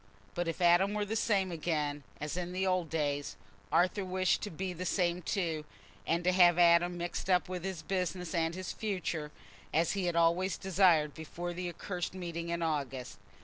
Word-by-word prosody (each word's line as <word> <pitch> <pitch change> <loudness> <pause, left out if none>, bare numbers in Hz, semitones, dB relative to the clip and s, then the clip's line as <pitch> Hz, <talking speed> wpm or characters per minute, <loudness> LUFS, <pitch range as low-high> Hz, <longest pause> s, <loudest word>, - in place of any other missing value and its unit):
But 175 0 -2
if 165 +2 -3
Adam 180 +4 +5
were 210 -1 0
the 215 +2 -3
same 195 -4 +1
again 150 -3 -1 0.2
as 150 +2 -3
in 180 0 -3
the 190 +1 0
old 185 -3 +1
days, 145 -7 -1 0.4
Arthur 185 +3 +2
wished 185 0 +1
to 210 - -4
be 185 +2 -4
the 175 +1 -5
same 180 -1 0
too, 165 -5 -1 0.4
and 170 +2 +1
to 180 - +3
have 175 -2 +6
Adam 175 0 +5
mixed 175 +2 -4
up 180 -1 +3
with 180 -1 -5
his 190 -4 -4
business 180 -2 -2
and 165 -1 0
his 185 -1 -4
future, 180 -7 -3 0.4
as 165 +2 +2
he 195 -2 -1
had 175 -1 0
always 170 +3 +2
desired 175 -6 +3
before 175 +2 -6
the 180 0 -3
accursed 180 +1 -4
meeting 170 -2 -4
in 170 0 -1
August. 135 -9 -3
175 Hz, 190 wpm, -32 LUFS, 165-185 Hz, 0.4 s, have